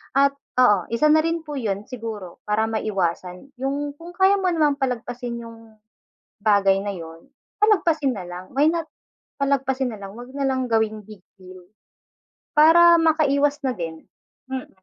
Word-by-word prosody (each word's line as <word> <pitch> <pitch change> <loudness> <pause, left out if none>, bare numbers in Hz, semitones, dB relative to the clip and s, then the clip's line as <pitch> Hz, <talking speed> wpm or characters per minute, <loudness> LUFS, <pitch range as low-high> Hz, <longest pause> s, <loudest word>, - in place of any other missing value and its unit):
At 280 0 +4 0.2
oo, 205 -7 +5
isa 270 +7 +2
na 310 - +6
rin 330 0 -1
po 295 - -5
'yun, 205 -6 -2
siguro 220 -7 -7
para 215 +1 +1
maiwasan 190 +1 -3
'yung 285 +2 -3
kung 340 +1 -10
kaya 390 +1 +4
mo 375 - +1
namang 300 -4 +2
palagpasin 245 -2 -4
'yung 230 0 -12 0.8
bagay 195 -2 +4
na 205 - -2
'yun, 165 -1 -11 0.4
palagpasin 325 - +2
na 190 - -6
lang 180 +1 -9
why 290 +3 +4
not 335 -1 -3 0.5
palagpasin 265 -2 0
na 215 - -9
lang 195 0 -9
huwag 245 +2 -10
na 275 -1 0
lang 260 -1 -1
gawing 220 -1 0
big 210 -1 -13 0.2
deal 185 -1 -13 0.9
para 340 +3 +7
makaiwas 290 -3 +2
na 255 - 0
din, 165 -4 -7 0.4
mm. 265 -1 -5
250 Hz, 160 wpm, -23 LUFS, 205-290 Hz, 0.9 s, para